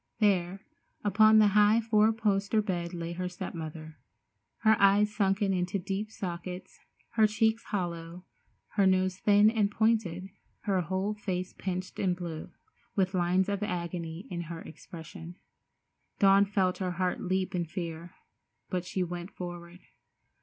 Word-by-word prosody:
There 195 -3 +1 0.4
upon 215 +1 +6
the 210 -1 +6
high 210 +2 +5
four 220 -1 +3
poster 210 -1 +1
bed 175 -5 -2
lay 170 -1 -5
her 180 +1 -3
step 180 +1 -6
mother, 155 -1 -8 0.6
her 220 -1 +5
eyes 205 +1 +5
sunken 195 -1 +2
into 180 +1 -1
deep 195 +3 -3
sockets, 180 -2 -6 0.3
her 220 -2 +4
cheeks 220 +1 +1
hollow, 175 -2 -4 0.4
her 200 -2 +2
nose 185 0 +2
thin 205 +1 +5
and 215 -3 +2
pointed, 210 -5 0 0.3
her 195 -4 +1
whole 190 +4 -1
face 185 -3 -4
pinched 185 -1 -5
and 180 -2 +1
blue, 170 -3 -6 0.5
with 190 -1 +1
lines 180 +1 +2
of 200 0 -2
agony 170 -3 -4
in 170 -1 -3
her 170 -1 -6
expression. 165 +1 -10 0.8
Dawn 195 0 +6
felt 190 -2 0
her 185 -2 -2
heart 180 0 -1
leap 190 +1 -1
in 175 -2 -1
fear, 170 0 -6 0.6
but 180 -1 -1
she 185 +1 -1
went 175 +1 -5
forward. 175 -1 -8
185 Hz, 145 wpm, -29 LUFS, 175-205 Hz, 0.8 s, upon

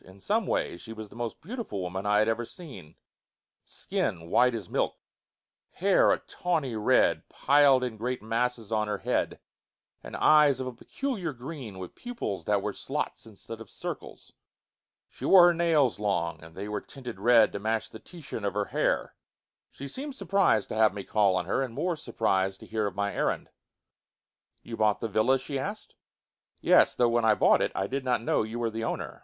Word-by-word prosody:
In 95 +1 -16
some 215 - 0
ways 85 - -1
she 115 - -9
was 110 -1 -9
the - - -15
most 120 -1 -5
beautiful 225 - -5
woman 95 +2 -4
that - - 0
I 105 - +4
had 110 +1 +3
ever 115 +1 0
seen: 120 - -11 0.7
skin 85 0 -3
white 125 -1 +4
as 105 -6 -5
milk, - - -1 0.8
hair - - +4
a - - +3
tawny 155 -9 -2
red, 105 -1 +2
piled 140 -2 +4
in 120 -3 -3
great 125 +3 -2
masses 115 0 -2
on 110 -1 +1
her 105 -1 -2
head, - - -1 0.6
and - - -8
eyes 150 -3 +5
of 130 - -3
a 130 - -5
peculiar 190 - -4
green, 125 - -8
with 90 -1 -8
pupils 245 -1 -5
that - - +1
were - - -2
slots - - -4
instead - - -10
of - - -11
circles. - - -8 0.7
She - - -14
wore 185 -2 +8
her - - +2
nails 160 -9 +2
long, 85 -6 -1
and 80 0 -13
they 100 +2 -5
were 105 0 -3
tinted 125 -7 -9
red 115 +1 +5
to 100 - -5
match 110 +2 -2
the 110 - -10
Titian 155 - -9
of 100 0 -2
her 105 0 0
hair. - - 0 0.6
She 140 - -9
seemed 275 - -6
surprized 195 - +2
to - - -4
have 110 -2 +3
me 100 - -5
call 100 -3 +2
on 90 -2 -1
her, 95 - 0
and 125 -4 -4
more 175 -1 -1
surprized 95 -9 -1
to - - -10
hear 110 -1 -1
of 95 - -6
my 100 0 -1
errand. - - -1 1.1
"You 115 - -7
bought 105 -1 +2
the 115 - -2
villa?" 110 +6 +3
she 135 +1 -4
asked. 205 +9 -6 0.7
"Yes. - - +5
Though, 120 -1 +3
when 120 0 +1
I 110 -1 +5
bought - - +4
it, - - 0
I 95 - 0
did 135 +6 -3
not 125 -3 0
know - - +2
that 110 - -4
you 115 - -5
were 115 -1 -1
the 115 +1 -4
owner. - - -4
115 Hz, 200 wpm, -28 LUFS, 105-140 Hz, 1.1 s, wore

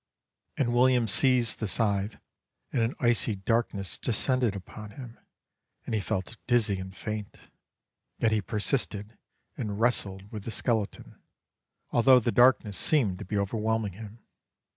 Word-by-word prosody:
And 120 -4 +1
William 125 -1 +4
seized 125 +3 +3
the 110 - -2
scythe 100 0 0 0.6
and 120 - +1
an 115 +3 0
icy 120 -3 +2
darkness 100 -1 -1
descended 125 -1 0
upon 105 +2 -9
him, 120 +2 -11 0.7
and - - -5
he 110 - +1
felt 95 +4 -3
dizzy 110 -6 +2
and 95 0 -8
faint; 105 -2 -5 0.8
yet 115 - +1
he 110 -1 +1
persisted 105 0 -2 0.4
and 105 -2 -4
wrestled 100 -4 0
with 105 -3 -6
the - - -4
skeleton, 110 -2 -2 0.7
although 125 +2 +6
the 120 0 -1
darkness 115 -6 +4
seemed 105 - +1
to - - -7
be 105 +3 -3
overwhelming 110 0 -1
him. 105 +2 -10
110 Hz, 140 wpm, -28 LUFS, 100-120 Hz, 0.8 s, although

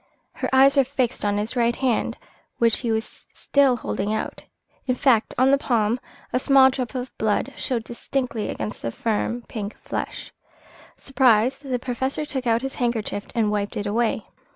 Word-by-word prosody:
Her - - -3
eyes 270 +2 +6
were 275 - +7
fixed 260 -2 -1
on 205 0 +1
his 215 +4 -2
right 235 -1 +2
hand, 255 -4 0 0.4
which 230 -2 +3
he 235 -3 -1
was 220 +1 0
still 275 -3 +1
holding 210 -3 -3
out. 220 - -3 0.5
In 255 - +2
fact, 245 -4 +2
on 260 +2 +5
the 275 - +4
palm 235 -2 +1 0.3
a 250 - +3
small 265 0 +6
drop 255 -1 -4
of 255 0 -5
blood 220 +5 0
showed 240 -4 -2
distinctly 240 -1 -3
against 110 0 -4
the 115 - -2
firm, 230 - -2
pink 210 -3 -5
flesh. - - -5 0.7
Surprised, 255 0 +3
the 250 - +1
Professor 260 +4 -2
took 265 -4 -4
out 230 +2 +2
his 270 0 -3
handkerchief 220 -4 -1
and 220 -3 +2
wiped 205 -1 -2
it 205 - -2
away. 225 +3 0
240 Hz, 175 wpm, -23 LUFS, 220-265 Hz, 0.7 s, were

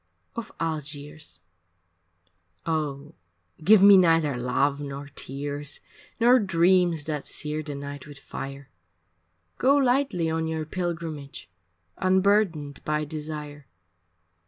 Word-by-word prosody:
II - - -47 0.2
Off - - -15
Algiers 150 - -5 1.2
Oh 150 -2 -2 0.5
give 200 +3 +7
me 200 -1 +9
neither 165 -6 +4
love 135 +3 0
nor 140 0 -6
tears, 145 +2 -4 0.4
Nor 245 +2 +6
dreams 175 -4 +3
that 150 -2 -4
sear 150 0 -2
the 150 -2 -6
night 140 0 -7
with 145 -1 -11
fire, 135 0 -8 0.9
Go 275 +2 +4
lightly 255 - +2
on 160 0 -1
your 160 -1 -3
pilgrimage 165 - -5 0.5
Unburdened 185 -6 +2
by 150 0 -1
desire. 150 -2 -7
155 Hz, 110 wpm, -26 LUFS, 145-175 Hz, 1.2 s, me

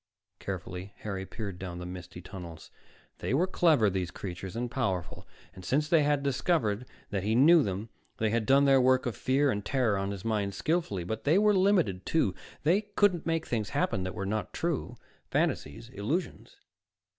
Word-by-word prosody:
_ - - -53
Carefully, 95 0 -6
Harry 95 -2 -4
peered 100 -5 -6
down 90 -2 -6
the 90 - -6
misty 90 -1 -8
tunnels. 85 -4 -9 0.5
They 125 - -1
were 170 +6 +3
clever, 160 - +3
these 95 -3 -1
creatures, 95 +1 -7
and 120 +1 -3
powerful. 95 -11 -2 0.3
Since 140 +10 0
they 165 -2 +5
had 145 -1 +1
discovered 125 - 0 0.2
that 100 -3 -1
he 110 +4 0
knew 160 +6 +7
them, 100 -1 -3 0.3
they 110 -1 +1
had 115 -1 0
done 140 +1 +5
their 135 -1 +5
work 130 0 +3
of 120 - -2
fear 135 +2 +2
and 105 -2 -3
terror 120 -4 +1
on 100 0 -2
his 100 0 -6
mind 105 -3 -1
skillfully. 155 - -1
But 110 +6 -4
they 155 +5 +4
were 210 +1 +5
limited, 185 - +2
too; 130 - +1 0.3
they 175 +7 +4
couldn't 205 -5 +1
make 165 -1 0
things 110 -4 -2
happen 95 - 0
that 95 +2 -4
were 100 -2 -3
not 110 +2 -2
true - - -2 0.3
fantasies, 75 +11 -1
illusions.... 135 - -4
110 Hz, 180 wpm, -29 LUFS, 95-145 Hz, 0.5 s, knew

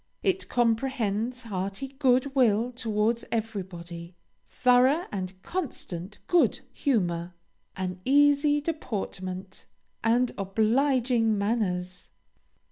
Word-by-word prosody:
It 380 -1 0
comprehends 240 -1 0
hearty 195 +4 -4
good 270 0 +2
will 240 -2 +3
towards 230 -1 0
everybody, 180 -6 -5 0.3
thorough 255 +7 +4
and 185 -2 -5
constant 210 - -5
good 350 -1 +3
humor, 175 - 0 0.4
an 185 -1 -4
easy 290 +2 +4
deportment, 195 - -5 0.4
and 235 +2 +3
obliging 225 +2 +2
manners. 185 -4 -2
225 Hz, 85 wpm, -27 LUFS, 190-260 Hz, 0.4 s, thorough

